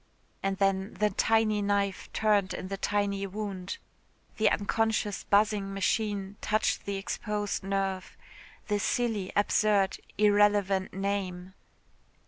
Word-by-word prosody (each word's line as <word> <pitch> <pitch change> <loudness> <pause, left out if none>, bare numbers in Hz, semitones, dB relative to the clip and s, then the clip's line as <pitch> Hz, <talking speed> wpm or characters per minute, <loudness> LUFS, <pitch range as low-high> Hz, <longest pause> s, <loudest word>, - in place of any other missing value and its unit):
And 195 0 -1
then 195 +1 0
the 210 0 +1
tiny 215 +1 +2
knife 200 -1 -1
turned 205 -3 +2
in 185 - -6
the 195 - -3
tiny 200 0 0
wound. 195 -2 -5 0.6
The 215 - +4
unconscious 215 0 0
buzzing 205 -1 +2
machine 205 0 -1
touched 215 +1 0
the 200 - -2
exposed 205 +1 -3
nerve 195 -1 -2 0.5
the 205 -1 +1
silly, 215 -3 0
absurd, 205 -1 +2 0.2
irrelevant 205 -2 +3
name. 190 -2 -3
200 Hz, 110 wpm, -29 LUFS, 195-210 Hz, 0.6 s, The